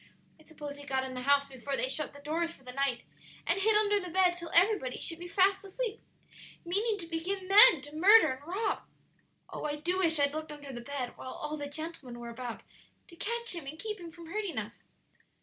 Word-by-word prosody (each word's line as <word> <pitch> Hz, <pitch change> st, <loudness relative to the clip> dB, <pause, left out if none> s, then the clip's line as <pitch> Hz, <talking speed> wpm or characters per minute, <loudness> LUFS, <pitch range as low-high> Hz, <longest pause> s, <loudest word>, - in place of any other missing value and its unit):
I -, -, -18 dB
suppose 295 Hz, -2 st, -9 dB
he 285 Hz, -, -10 dB
got 265 Hz, -2 st, -1 dB
in 260 Hz, 0 st, -6 dB
the 250 Hz, -, -5 dB
house 280 Hz, +1 st, +3 dB
before 270 Hz, +1 st, -4 dB
they -, -, +1 dB
shut 285 Hz, +3 st, -1 dB
the 285 Hz, -, -13 dB
doors 330 Hz, +3 st, -1 dB
for 270 Hz, -, -15 dB
the 250 Hz, -, -8 dB
night, 270 Hz, -3 st, 0 dB, 0.4 s
and 390 Hz, -, +1 dB
hid 435 Hz, +2 st, +4 dB
under 415 Hz, -1 st, +4 dB
the 365 Hz, -2 st, -6 dB
bed 365 Hz, +1 st, +4 dB
till 345 Hz, -1 st, -7 dB
everybody 350 Hz, -, +3 dB
should 330 Hz, 0 st, -2 dB
be 350 Hz, -, -7 dB
fast 385 Hz, +3 st, +2 dB
asleep, 440 Hz, +3 st, -4 dB, 0.6 s
meaning 415 Hz, +5 st, 0 dB
to 355 Hz, -, -5 dB
begin 360 Hz, +4 st, -3 dB
then 410 Hz, -, +9 dB
to 290 Hz, +2 st, -9 dB
murder 400 Hz, +3 st, +7 dB
and 275 Hz, +4 st, -13 dB
rob. 410 Hz, +5 st, -1 dB, 0.7 s
Oh, -, -, -5 dB
I 295 Hz, -1 st, -1 dB
do 350 Hz, +5 st, -1 dB
wish 325 Hz, -4 st, +4 dB
I'd 285 Hz, 0 st, +3 dB
looked 310 Hz, 0 st, -5 dB
under 290 Hz, -2 st, -9 dB
the 240 Hz, -, -6 dB
bed 260 Hz, -1 st, -5 dB
while 260 Hz, -, -7 dB
all 300 Hz, -, -5 dB
the 290 Hz, -1 st, -5 dB
gentlemen 290 Hz, -5 st, -6 dB
were 235 Hz, 0 st, -7 dB
about 235 Hz, 0 st, -6 dB, 0.5 s
to 340 Hz, -, -14 dB
catch 470 Hz, +5 st, -2 dB
him 335 Hz, -5 st, -5 dB
and 305 Hz, +3 st, -6 dB
keep 425 Hz, +3 st, -4 dB
him 340 Hz, -1 st, -8 dB
from 335 Hz, 0 st, -12 dB
hurting 400 Hz, +2 st, -4 dB
us! -, -, -5 dB
325 Hz, 225 wpm, -30 LUFS, 280-380 Hz, 0.7 s, then